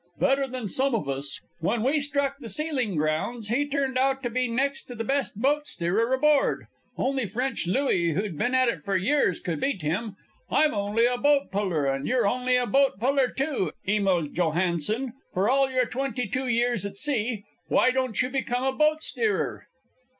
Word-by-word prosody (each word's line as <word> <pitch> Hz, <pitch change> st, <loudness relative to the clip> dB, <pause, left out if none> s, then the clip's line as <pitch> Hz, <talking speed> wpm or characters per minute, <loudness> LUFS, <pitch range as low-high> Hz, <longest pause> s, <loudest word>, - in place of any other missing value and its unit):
"Better 275 Hz, 0 st, +2 dB
than 255 Hz, -4 st, -4 dB
some 265 Hz, +4 st, +1 dB
of 200 Hz, -11 st, -2 dB
us! 135 Hz, 0 st, -1 dB, 0.2 s
When 215 Hz, +7 st, 0 dB
we 280 Hz, +5 st, +2 dB
struck 280 Hz, -1 st, -1 dB
the 235 Hz, -5 st, -8 dB
sealing 260 Hz, -, -1 dB
grounds 160 Hz, +9 st, -1 dB
he 280 Hz, +6 st, +1 dB
turned 270 Hz, -2 st, -1 dB
out 270 Hz, +1 st, +1 dB
to 240 Hz, -, -2 dB
be 255 Hz, +1 st, 0 dB
next 270 Hz, +4 st, -1 dB
to 245 Hz, -, -9 dB
the 225 Hz, -, -3 dB
best 270 Hz, -3 st, -1 dB
boat 295 Hz, +4 st, +1 dB
steerer 195 Hz, +8 st, 0 dB
aboard. 290 Hz, +2 st, +2 dB, 0.3 s
Only 265 Hz, -3 st, 0 dB
French 245 Hz, 0 st, -2 dB
Louis, 180 Hz, -, +1 dB
who'd 195 Hz, +1 st, -2 dB
been 245 Hz, -, 0 dB
at 255 Hz, -1 st, +4 dB
it 175 Hz, -10 st, -2 dB
for 195 Hz, -1 st, 0 dB
years, 195 Hz, -, +1 dB
could 165 Hz, -4 st, -3 dB
beat 200 Hz, -, -1 dB
him. 195 Hz, +7 st, -2 dB, 0.3 s
I'm 310 Hz, -1 st, +3 dB
only 205 Hz, +3 st, +1 dB
a 245 Hz, 0 st, +1 dB
boat 285 Hz, +1 st, +2 dB
puller, 185 Hz, -7 st, 0 dB
and 135 Hz, +1 st, -1 dB
you're 255 Hz, 0 st, +2 dB
only 250 Hz, +3 st, +1 dB
a 250 Hz, 0 st, +2 dB
boat 270 Hz, -5 st, +2 dB
puller, 265 Hz, +2 st, +2 dB
too, 265 Hz, -, -2 dB
Emil 190 Hz, -6 st, +1 dB
Johansen, 180 Hz, -, 0 dB, 0.2 s
for 190 Hz, +3 st, +2 dB
all 270 Hz, +1 st, +3 dB
your 255 Hz, -1 st, +1 dB
twenty 250 Hz, -1 st, -3 dB
two 255 Hz, +6 st, -2 dB
years 240 Hz, -2 st, +1 dB
at 200 Hz, -1 st, -6 dB
sea. 230 Hz, -5 st, 0 dB, 0.2 s
Why 255 Hz, -, +4 dB
don't 255 Hz, -3 st, -1 dB
you 250 Hz, -, -2 dB
become 255 Hz, -2 st, -1 dB
a 265 Hz, 0 st, +1 dB
boat 310 Hz, +2 st, +2 dB
steerer?" 440 Hz, -2 st, -1 dB
245 Hz, 190 wpm, -26 LUFS, 200-270 Hz, 0.3 s, at